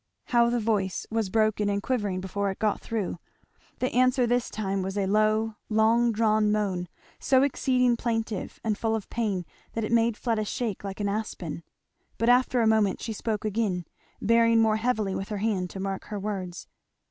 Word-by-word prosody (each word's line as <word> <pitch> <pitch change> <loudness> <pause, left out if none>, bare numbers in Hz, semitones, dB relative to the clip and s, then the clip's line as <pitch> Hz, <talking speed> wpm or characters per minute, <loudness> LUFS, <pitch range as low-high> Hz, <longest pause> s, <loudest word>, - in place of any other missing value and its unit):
How 235 -1 +4
the 240 0 +1
voice 210 -4 -1
was 220 -3 0
broken 215 0 +2
and 200 0 0
quivering 205 -8 -1
before 200 +1 -2
it 190 - -4
got 215 -1 0
through! 205 -6 -3 0.6
The 255 - -1
answer 255 0 +3
this 245 0 +1
time 195 -2 -2
was 190 +2 -3
a 200 - +1
low 215 +2 +2
long 225 +2 +3
drawn 215 -1 +2
moan, 195 -4 -1 0.3
so 260 0 +4
exceeding 250 -3 +2
plaintive 225 -4 -3
and 220 -2 0
full 225 +1 0
of 220 - -6
pain 205 -6 -1 0.3
that 225 - -2
it 215 - -3
made 230 -1 +3
Fleda 225 -3 -1
shake 215 -2 -3
like 195 +1 -5
an 205 - 0
aspen. 200 -6 -4 0.6
But 230 - +2
after 250 0 +4
a - - +3
moment 220 -3 +3
she 225 - -4
spoke 215 0 -3
again, 200 -5 -1 0.3
bearing 230 +1 +4
more 220 -1 +3
heavily 220 -4 0
with 195 - -4
her 210 - -3
hand 195 -3 -1
to 195 - -8
mark 195 0 -3
her 210 - -5
words. 190 -3 -5
215 Hz, 185 wpm, -27 LUFS, 200-230 Hz, 0.6 s, How